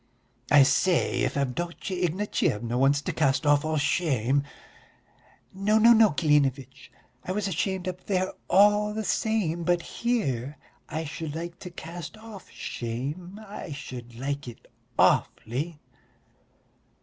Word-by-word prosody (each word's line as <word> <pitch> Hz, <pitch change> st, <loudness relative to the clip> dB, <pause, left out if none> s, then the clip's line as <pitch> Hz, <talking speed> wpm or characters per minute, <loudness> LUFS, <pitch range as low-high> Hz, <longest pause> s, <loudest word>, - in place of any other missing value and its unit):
"I 145 Hz, -2 st, +8 dB
say, 175 Hz, +5 st, +2 dB
if -, -, 0 dB
Avdotya 170 Hz, +7 st, -3 dB
Ignatyevna 170 Hz, -, -1 dB
wants 140 Hz, +3 st, +3 dB
to -, -, -2 dB
cast 140 Hz, -1 st, +1 dB
off 145 Hz, 0 st, +4 dB
all 155 Hz, 0 st, -1 dB
shame...." 140 Hz, -4 st, +1 dB, 1.1 s
"No, 200 Hz, +3 st, +2 dB
no, 230 Hz, +2 st, +7 dB
no, 225 Hz, -2 st, +6 dB
Klinevitch, 140 Hz, -4 st, 0 dB, 0.3 s
I -, -, -4 dB
was 205 Hz, +1 st, -1 dB
ashamed 190 Hz, +1 st, -2 dB
up 185 Hz, 0 st, -5 dB
there 185 Hz, -1 st, 0 dB, 0.2 s
all 210 Hz, +2 st, +4 dB
the 220 Hz, -, -2 dB
same, 190 Hz, -3 st, 0 dB
but 175 Hz, 0 st, +1 dB
here 150 Hz, -, -2 dB, 0.3 s
I 160 Hz, +1 st, -3 dB
should 155 Hz, 0 st, -5 dB
like 170 Hz, +1 st, -6 dB
to 180 Hz, -, -8 dB
cast 170 Hz, +2 st, -8 dB
off 215 Hz, -3 st, -11 dB
shame, 145 Hz, -, -5 dB
I 195 Hz, -6 st, -7 dB
should 125 Hz, -4 st, -8 dB
like 140 Hz, +2 st, -4 dB
it 120 Hz, -, -10 dB, 0.3 s
awfully." 145 Hz, +8 st, +1 dB
165 Hz, 130 wpm, -27 LUFS, 140-190 Hz, 1.1 s, I